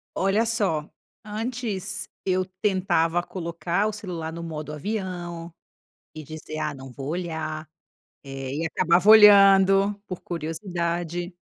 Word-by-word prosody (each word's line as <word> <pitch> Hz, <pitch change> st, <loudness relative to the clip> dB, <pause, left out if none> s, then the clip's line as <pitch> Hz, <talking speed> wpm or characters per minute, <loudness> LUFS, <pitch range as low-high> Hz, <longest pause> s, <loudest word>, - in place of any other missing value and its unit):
Olha 195 Hz, +4 st, +2 dB
só! 195 Hz, -10 st, 0 dB, 0.3 s
Antes, 210 Hz, -3 st, -4 dB, 0.2 s
eu 185 Hz, 0 st, +1 dB, 0.2 s
tentava 175 Hz, -4 st, +1 dB
colocar 175 Hz, +3 st, -2 dB
o -, -, -1 dB
celular 175 Hz, -6 st, -5 dB
no 170 Hz, -, -6 dB
modo 155 Hz, -2 st, -6 dB
avião 175 Hz, -1 st, -5 dB, 0.6 s
e 155 Hz, -, -7 dB
dizer: 155 Hz, +1 st, -8 dB
"Ah, 150 Hz, -, -2 dB
não 135 Hz, -1 st, -10 dB
vou 135 Hz, +2 st, -7 dB
olhar", 160 Hz, -2 st, -4 dB, 0.6 s
eh, 135 Hz, -1 st, -6 dB
e 160 Hz, +2 st, -2 dB
acabava 170 Hz, +4 st, +2 dB
olhando, 195 Hz, -2 st, +7 dB
por 185 Hz, -, -6 dB
curiosidade. 170 Hz, +1 st, -3 dB
175 Hz, 120 wpm, -25 LUFS, 160-195 Hz, 0.6 s, olhando